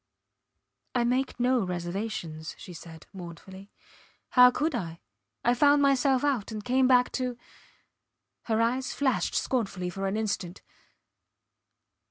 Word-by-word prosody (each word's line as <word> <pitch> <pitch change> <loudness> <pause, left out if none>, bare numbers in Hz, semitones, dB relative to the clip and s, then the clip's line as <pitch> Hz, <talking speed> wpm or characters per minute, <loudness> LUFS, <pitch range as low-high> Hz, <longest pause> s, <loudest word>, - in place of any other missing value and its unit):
I 245 - +3
make 255 +2 0
no 250 -1 +2
reservations, 175 -3 -4
she 180 - -10
said, 160 -1 -11
mournfully. 190 +2 -10 0.6
How 250 0 +8
could 300 +5 -1
I? 170 -8 -4 0.5
I 240 - +5
found 285 +3 +4
myself 270 -1 +3
out 265 -8 0
and 215 -1 -6
came 255 +1 +3
back 250 -1 +4
to... 250 -2 -3 1.1
her 220 -1 0
eyes 250 +3 0
flashed 265 -3 0
scornfully 195 -8 -1
for 195 +2 -3
an 195 +2 -1
instant 200 -4 -3
230 Hz, 125 wpm, -28 LUFS, 185-255 Hz, 1.1 s, How